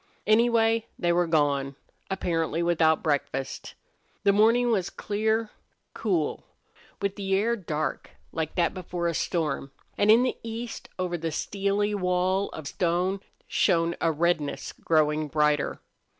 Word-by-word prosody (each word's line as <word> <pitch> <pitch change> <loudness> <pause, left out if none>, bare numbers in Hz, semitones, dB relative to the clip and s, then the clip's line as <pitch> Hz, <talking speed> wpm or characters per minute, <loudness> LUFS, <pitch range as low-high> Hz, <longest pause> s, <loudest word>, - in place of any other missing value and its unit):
Anyway, 225 0 +3
they 175 0 +1
were 175 0 +2
gone, 140 -4 +1 0.3
apparently 170 -3 -1
without 160 -2 +3
breakfast. 140 -3 -2 0.5
The 200 -1 +5
morning 230 +4 +4
was 190 -6 +1
clear, 220 +1 -1 0.4
cool, 180 -9 -1 0.6
with 200 0 -2
the 195 -1 0
air 225 +4 +2
dark 155 -7 -3 0.2
like 160 -1 -3
that 170 -2 +2
before 180 -2 -3
a 170 - 0
storm, 155 -5 -1 0.3
and 205 - +3
in 230 +3 +7
the 255 - -1
east, 230 +1 -6
over 180 -2 -2
the 165 0 -2
steely 200 +5 -1
wall 185 0 +1
of 155 - -7
stone, 180 +4 0 0.3
shone 170 0 +2
a 165 - +3
redness 160 -2 0
growing 155 -1 +1
brighter. 150 0 +1
175 Hz, 135 wpm, -27 LUFS, 160-205 Hz, 0.6 s, in